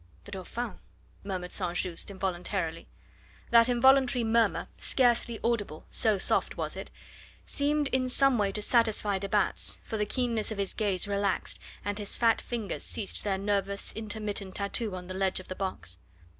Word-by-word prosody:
"The - - -11
Dauphin," 215 +5 -5 0.4
murmured 185 -2 -4
St. 175 0 -2
Just 175 +1 -1
involuntarily. 180 -3 -2 0.6
That 235 +1 +7
involuntary 255 0 +5
murmur, 230 0 +2
scarcely 240 -2 +2
audible, 205 -10 -1
so 215 -2 +3
soft - - +1
was - - -2
it, - - -6 0.6
seemed 290 0 +1
in 255 -1 +1
some 270 -1 +4
way 200 -1 +2
to 210 - 0
satisfy 215 -4 +3
de 200 +1 -4
Batz, 205 -1 0
for 220 - -4
the 210 0 0
keenness 235 -3 0
of 215 - -4
his 200 -1 -1
gaze 205 -3 0
relaxed, 200 -1 -1 0.3
and 205 +1 -2
his 205 - -2
fat 230 -2 +3
fingers 225 -6 -4
ceased 200 - -3
their 195 -2 0
nervous, 200 0 -1
intermittent 210 -3 -3
tattoo 200 0 -1
on 180 -1 -7
the 185 - -6
ledge 190 0 0
of 185 - -12
the - - -2
box. 90 - -3
205 Hz, 165 wpm, -29 LUFS, 195-235 Hz, 0.6 s, That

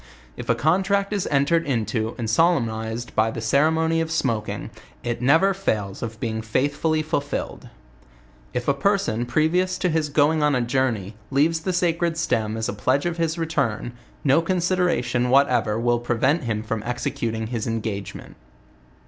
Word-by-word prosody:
If - - -8
a - - +4
contract 195 +5 +1
is 200 -3 -1
entered 145 +4 +2
into 110 -3 -1
and 115 -3 -3
solemnized 115 -5 0
by 110 +1 +3
the 110 - -5
ceremony 160 +7 +2
of 165 - -2
smoking, 115 - -2 0.3
it 120 -1 -3
never 165 +10 +4
fails 105 - -2
of 115 -1 -5
being 110 -1 -2
faithfully 145 +7 0
fulfilled.. 145 -2 -3 0.8
If 125 0 -3
a 140 - +4
person, 140 - 0
previ 155 +8 +2
ous 185 0 -2
to 180 - 0
his 155 -2 0
going 150 +2 +3
on 150 -2 +3
a 125 - +1
journey, 120 -5 -1
leaves 155 +4 +2
the 185 +4 -2
sacred 170 -2 0
stem 110 -10 0
as 110 - -2
a - - -2
pledgo 135 +10 +1
of 170 - -8
his 165 0 -1
return, 140 -8 -1 0.3
no 140 +3 +4
consideration 170 -9 0
whatever 130 -5 +3
will 120 0 +2
prevent 125 +6 +1
him 110 -2 -2
from 110 -1 -3
executing 115 -1 -3
his 115 -1 -2
engagement. 110 -4 -5
135 Hz, 160 wpm, -23 LUFS, 115-165 Hz, 0.8 s, a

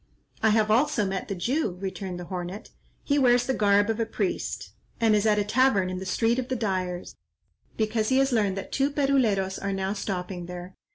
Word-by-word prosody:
"I 220 - +4
have 215 0 +3
also 245 -1 +3
met 190 -1 -3
the 195 - -3
Jew," 235 - 0
returned 190 -1 -5
the - - -5
hornet; 180 +3 -6 0.3
"he 285 0 +2
wears 245 -2 +4
the 265 - 0
garb 205 -2 +3
of 225 0 -1
a 230 - +1
priest, 205 -4 -3 0.3
and 225 -2 +4
is 210 +1 +2
at 210 -1 +3
a 205 - +2
tavern 210 -4 +2
in 185 - -4
the 190 - -6
Street 230 +5 +1
of 250 - -3
the 260 - -1
Dyers, 185 -5 -3 0.6
because 215 0 0
he 260 - +3
has 270 0 +3
learned 205 -5 +1
that 195 - -6
two 275 +1 +1
Peruleros 250 -10 +1
are 200 0 -2
now 195 0 -1
stopping 180 -3 -4
there. 180 +1 -8
210 Hz, 210 wpm, -26 LUFS, 190-240 Hz, 0.6 s, I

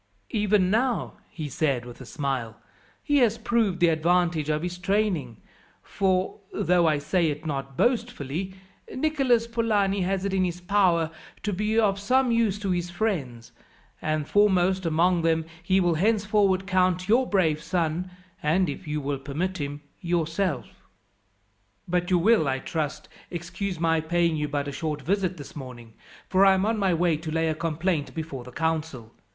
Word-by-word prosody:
"Even 205 -3 +2
now," 240 +2 0 0.2
he 155 -3 -6
said 135 -3 -1
with 120 +1 -11
a 130 - -10
smile, 130 -7 -3 0.5
"he 290 -1 +2
has 235 -4 +3
proved 225 -5 0
the 175 -2 +5
advantage 165 -1 +1
of 155 +1 0
his 180 0 -4
training; 180 - 0 0.5
for, 185 -2 0
though 175 0 +2
I 155 -1 +3
say 160 +4 +1
it 150 +2 -5
not 135 -3 -4
boastfully, 190 - -1 0.4
Nicholas 265 -5 +2
Polani 215 -4 +1
has 190 +1 -1
it 200 - -1
in 190 -1 +2
his 175 -1 -2
power 180 -4 +2 0.3
to 210 - -1
be 210 +4 0
of 200 -3 +2
some 255 +5 +2
use 230 -4 +2
to 195 -3 -1
his 175 -1 -1
friends, 160 - -3 0.5
and 155 -1 -1
foremost 190 -3 +3
among 170 +2 +2
them 160 -1 +1 0.2
he 190 +2 +2
will 175 -2 +2
henceforward 200 0 +2
count 185 -1 +1
your 245 +4 +3
brave 160 -6 +2
son, 165 +1 -1 0.3
and, 170 +3 +2
if 150 +4 -7
you 150 0 -2
will 140 0 -2
permit 165 +7 -3
him, 145 0 -4 0.2
yourself. 170 -3 -1 1.2
"But 175 0 0
you 180 - +4
will, 200 -2 +4
I 135 0 +1
trust, 150 +2 -4 0.2
excuse 180 +1 -4
my 165 -1 +2
paying 170 0 +1
you 150 -1 -1
but 145 0 -2
a - - -3
short 150 0 -4
visit 185 +2 0
this 145 - -10
morning, 125 -5 -9 0.3
for 190 +1 +4
I 195 -1 +6
am 190 +1 +1
on 220 0 0
my 195 -2 +2
way 170 -2 +2
to 160 +1 -7
lay 160 +1 0
a - - +1
complaint 160 0 -2
before 155 -6 -5
the 125 - -11
council. 155 -7 -3
175 Hz, 170 wpm, -26 LUFS, 155-195 Hz, 1.2 s, I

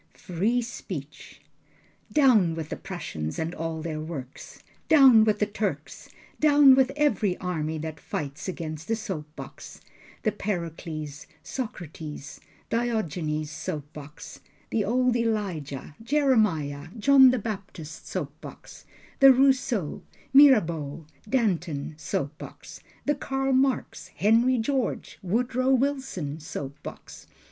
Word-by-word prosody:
Free 215 +7 0
speech! 155 - -8 0.7
Down 225 - +4
with 160 -2 -5
the - - -3
Prussians, 80 - -5
and 160 +2 -2
all 160 -1 -4
their 160 -2 -3
works. 150 -5 -8 0.3
Down 265 -8 +8
with 215 -1 +2
the 210 - +2
Turks. 200 -8 -4 0.3
Down 290 -3 +7
with 265 0 +4
every 255 -11 +1
army 160 -3 -3
that 155 0 -6
fights 145 +1 -5
against 160 -4 -5
the 225 - +1
soap 190 -9 -5
box, - - -10 0.4
The 215 - +2
Pericles, 165 -7 -5 0.2
Socrates, 160 - -7 0.3
Diogenes 170 -10 -1
soap 150 -1 -5
box, 150 0 -10 0.3
The 220 - +1
old 250 +3 +2
Elijah, 185 - -2
Jeremiah, 215 - +1
John 265 +3 +7
the 255 - +2
Baptist 195 -7 -7
soap - - -4
box, - - -12 0.3
The 270 -1 +9
Rousseau, 255 - +2 0.3
Mirabeau, 170 - +5 0.2
Danton 175 - 0
soap 145 -1 -3
box, - - -11 0.2
The 295 - +3
Karl 270 -1 -1
Marx, 265 0 0
Henry 235 +5 +3
George, 260 +2 -2
Woodrow 245 +6 0
Wilson 265 - 0
soap 140 -2 -7
box. - - -10
190 Hz, 120 wpm, -26 LUFS, 155-250 Hz, 0.7 s, The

